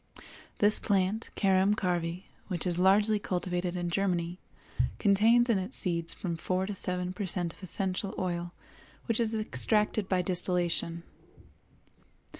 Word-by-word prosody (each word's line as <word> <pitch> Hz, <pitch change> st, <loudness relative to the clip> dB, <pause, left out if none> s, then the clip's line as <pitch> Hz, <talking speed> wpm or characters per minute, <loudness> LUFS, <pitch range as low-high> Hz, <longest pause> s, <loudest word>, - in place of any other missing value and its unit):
This 210 Hz, +1 st, +2 dB
plant, 200 Hz, +2 st, 0 dB
Carum 195 Hz, +1 st, +2 dB
Carvi, 175 Hz, -2 st, -2 dB, 0.2 s
which 180 Hz, -4 st, -3 dB
is 175 Hz, -1 st, -1 dB
largely 205 Hz, +3 st, +3 dB
cultivated 180 Hz, -1 st, -3 dB
in 175 Hz, -1 st, -3 dB
Germany, 175 Hz, -2 st, -1 dB, 0.6 s
contains 225 Hz, +4 st, +4 dB
in 225 Hz, -5 st, +2 dB
its 190 Hz, +7 st, -5 dB
seeds 170 Hz, -3 st, +3 dB
from 170 Hz, -3 st, -4 dB
four 185 Hz, +3 st, -1 dB
to 205 Hz, -, -4 dB
seven 180 Hz, -2 st, -3 dB
per 190 Hz, +1 st, -4 dB
cent 175 Hz, -2 st, -1 dB
of -, -, -20 dB
essential 190 Hz, +2 st, +2 dB
oil 175 Hz, -1 st, -3 dB, 0.5 s
which 230 Hz, -1 st, 0 dB
is 225 Hz, -1 st, 0 dB
extracted 215 Hz, -1 st, +1 dB
by 185 Hz, -1 st, +1 dB
distillation. 175 Hz, -2 st, -1 dB
185 Hz, 135 wpm, -29 LUFS, 175-205 Hz, 0.6 s, contains